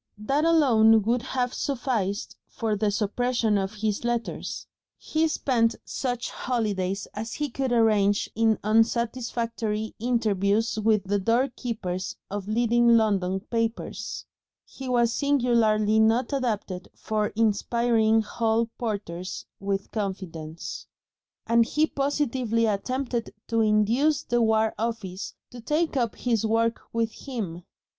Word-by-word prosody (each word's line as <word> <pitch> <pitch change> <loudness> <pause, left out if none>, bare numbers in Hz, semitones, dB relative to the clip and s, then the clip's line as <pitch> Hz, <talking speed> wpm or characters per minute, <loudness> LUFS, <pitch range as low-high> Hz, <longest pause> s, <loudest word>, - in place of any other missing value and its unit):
That 275 +9 0
alone 225 -10 +5
would 235 +3 +1
have 250 0 -2
sufficed 230 -7 -2
for 220 -2 -2
the 210 0 +1
suppression 220 +2 0
of 195 +1 -1
his 210 0 -1
letters. 240 -1 -3 0.3
He 320 +1 0
spent 235 -7 +1
such 245 -2 -3
holidays 205 -6 -2
as 220 +2 -5
he 295 -3 -3
could 265 0 -2
arrange 210 -3 +3
in 225 -1 +2
unsatisfactory 225 0 0
interviews 220 -2 +1
with 215 -1 +2
the 200 +1 0
door 235 +7 +2
keepers 185 -7 -4 0.2
of 200 -1 -4
leading 235 +1 +4
London 195 -4 +1
papers 230 +1 -3 0.4
he 265 -1 -8
was 235 -2 +3
singularly 230 -7 +2
not 230 +4 +3
adapted 210 -8 -2
for 215 -1 -1
inspiring 225 +1 +2
hall 225 +1 0
porters 195 -6 -4
with 195 0 -3
confidence 180 -6 -5 0.6
and 230 0 +4
he 300 +6 +1
positively 265 -6 0
attempted 240 +3 -2
to 230 -1 +2
induce 225 +8 +2
the 240 0 +1
War 220 -1 +3
Office 215 -5 -4 0.2
to 240 - -9
take 305 +6 0
up 240 -4 0
his 230 -4 0
work 230 +1 +1
with 230 -1 0 0.2
him. 200 -10 -4
225 Hz, 120 wpm, -26 LUFS, 210-240 Hz, 0.6 s, alone